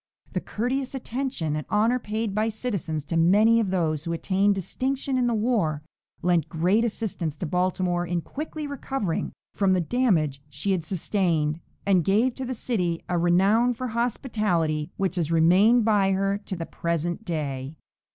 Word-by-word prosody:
The - - -1
courteous 260 +4 -2
attention 245 - -2
and 150 - -3
honor 225 +4 +2
paid 215 -1 -3
by 215 +2 +1
citizens 200 - -3
to 160 +4 -4
many 210 +7 +5
of 215 -4 0
those 160 -5 0
who 170 - -2
attained 195 +4 +2
distinction 260 +8 -2
in 250 -1 +2
the 235 - +1
war 210 -10 0 0.4
lent 175 -3 +2
great 180 +7 +2
assistance 205 -9 -2
to 165 - -4
Baltimore 180 +1 0
in 175 0 -1
quickly 305 - -6
recovering 270 - -3 0.2
from 195 -2 +2
the 185 - +2
damage 170 - +1
she 195 +7 -2
had 180 -4 0
sustained, 165 -3 0 0.3
and 190 -3 +3
gave 220 +8 +2
to 265 - -5
the 255 0 -3
city 180 -8 -1
a 175 -1 +1
renown 200 +8 +3
for 255 +2 -4
hospitality 210 - -1
which 190 -2 -1
has 165 -2 0
remained 190 +8 +5
by 200 -3 +3
her 195 +1 0
to 190 - -3
the 165 -1 -4
present 170 +4 -2
day. 145 -6 -3
195 Hz, 165 wpm, -25 LUFS, 165-230 Hz, 0.4 s, many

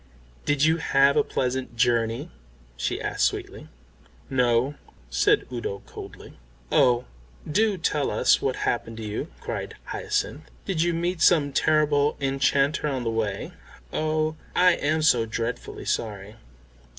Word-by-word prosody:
"Did 145 -1 +1
you 160 +1 +4
have 140 -2 +3
a - - +4
pleasant 130 -1 -2
journey?" 115 -1 +1 0.4
she 65 - -2
asked - - -1
sweetly. - - -6 0.6
"No," 125 +1 +2 0.4
said - - +3
Udo 115 -5 -4
coldly. - - -11 0.3
"Oh, 125 -1 +4 0.4
do 205 +5 +2
tell 150 -4 0
us - - +3
what 130 -2 0
happened 115 -1 -2
to 115 - -6
you?" 105 0 -3
cried - - -5
Hyacinth. - - -3 0.2
"Did 160 - 0
you 170 0 +1
meet 170 0 -2
some 150 -4 +4
terrible 150 -1 +2
enchanter 140 +2 +1
on 135 -4 -2
the 115 - -1
way? 110 -3 -2 0.4
Oh, 155 0 0 0.2
I 180 0 +6
am 155 -1 0
so 120 -7 +4
dreadfully 115 +2 -4
sorry." 105 -2 -3
135 Hz, 135 wpm, -25 LUFS, 115-155 Hz, 0.6 s, I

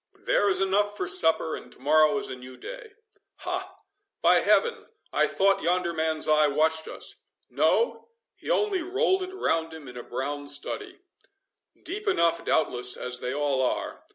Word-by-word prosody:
There 205 - +1
is 190 - +1
enough 205 +2 +1
for - - -2
supper, 160 -1 +3
and - - -11
to - - -19
morrow 155 +7 +4
is 205 0 -3
a - - -6
new 125 0 -12
day.—Ha! 440 -4 -8 0.5
by - - +6
heaven 465 -2 +2 0.3
I - - +3
thought 195 0 +2
yonder 175 0 0
man's 160 -1 0
eye 155 0 +4
watched 160 +2 +1
us—No—he 470 0 -3
only 420 -6 +1
rolled 380 +2 +1
it 370 0 -5
round 165 - -1
him 155 -3 -11
in 125 - -10
a - - -5
brown 145 +4 -5
study—Deep 390 - -8
enough 170 - +2
doubtless, 125 -5 +1
as 125 0 -4
they 125 - -3
all 140 -1 0
are. 130 - -2
170 Hz, 155 wpm, -26 LUFS, -, 0.5 s, by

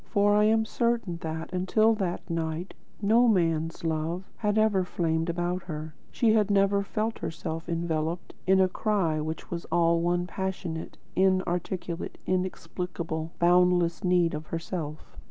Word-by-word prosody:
For 205 -1 +3
I 210 0 +5
am 220 +1 +3
certain 235 -7 0
that, 160 0 -5
until 215 +5 +3
that 190 -5 -3
night, 165 +1 -3 0.3
no 230 +4 +5
man's 165 -6 +1
love 165 +2 -1
had 210 -1 0
ever 215 -3 +3
flamed 165 -2 -1
about 175 +2 -1
her; 155 -2 -6 0.2
she 225 -2 +2
had 210 -2 +3
never 200 0 +3
felt 215 +3 -2
herself 165 +1 -5
enveloped 165 0 -2
in 190 0 +5
a 190 - +5
cry 185 -5 0
which 155 +1 -5
was 170 -1 -4
all 170 -1 +2
one 175 +1 +1
passionate, 180 -3 -4 0.2
in 185 0 +3
articulate, 175 0 -3
inexplicable, 180 -3 -3
boundless 175 0 +3
need 180 -2 +3
of 155 +1 -5
herself. 165 -2 -5
175 Hz, 145 wpm, -28 LUFS, 165-195 Hz, 0.3 s, I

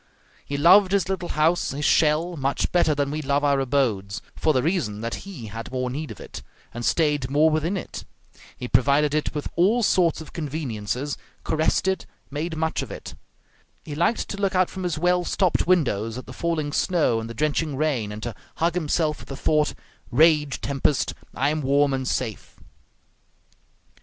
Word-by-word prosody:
He 140 - -4
loved 185 +6 +6
his 200 -3 +2
little 190 -2 -2
house, 160 +3 +2
his 145 +2 -3
shell, 165 +3 +3
much 140 -2 -1
better 160 -4 +3
than 140 -1 0
we 155 +1 -2
love 140 0 0
our 140 -1 +3
abodes, 120 -8 0 0.2
for 155 - +2
the 130 -4 +1
reason 140 - -1
that 115 +12 -5
he 145 - -8
had 115 +3 -7
more 130 -1 -2
need 150 +3 -4
of - - -9
it, - - -9 0.3
and 120 +1 -5
stayed 150 -2 +1
more 150 +3 +4
within 160 +5 0
it; - - -7 0.5
he 125 - -5
provided 140 +4 +3
it 155 0 -1
with 150 - -2
all 215 +8 +3
sorts 180 -5 +3
of 160 - -10
conveniences, 140 -4 -3 0.2
caressed 160 +3 +1
it, 190 0 -1 0.2
made 160 +3 -3
much 160 0 0
of - - -6
it; - - -8 0.7
he 150 - -6
liked 170 +9 +1
to 200 - -4
look 195 -1 0
out 185 -1 +3
from 190 - -6
his 175 -4 -2
well 180 +2 +2
stopped 180 -1 +1
windows 115 - +1
at 130 - -7
the - - -10
falling 155 -4 -2
snow 160 -12 +2
and 115 0 -6
the 115 - -7
drenching 155 +2 0
rain, 135 -8 0
and 105 +1 -7
to 120 - -3 0.2
hug 170 +1 +1
himself 155 -2 0
with - - -13
the 135 - -5
thought, 150 +1 +1 0.3
"Rage, 150 +1 +3
tempest, 140 0 0 0.2
I 140 +3 +1
am 155 0 -1
warm 140 +1 +3
and 130 -1 -2
safe!" 115 -6 -3
150 Hz, 185 wpm, -24 LUFS, 135-170 Hz, 0.7 s, loved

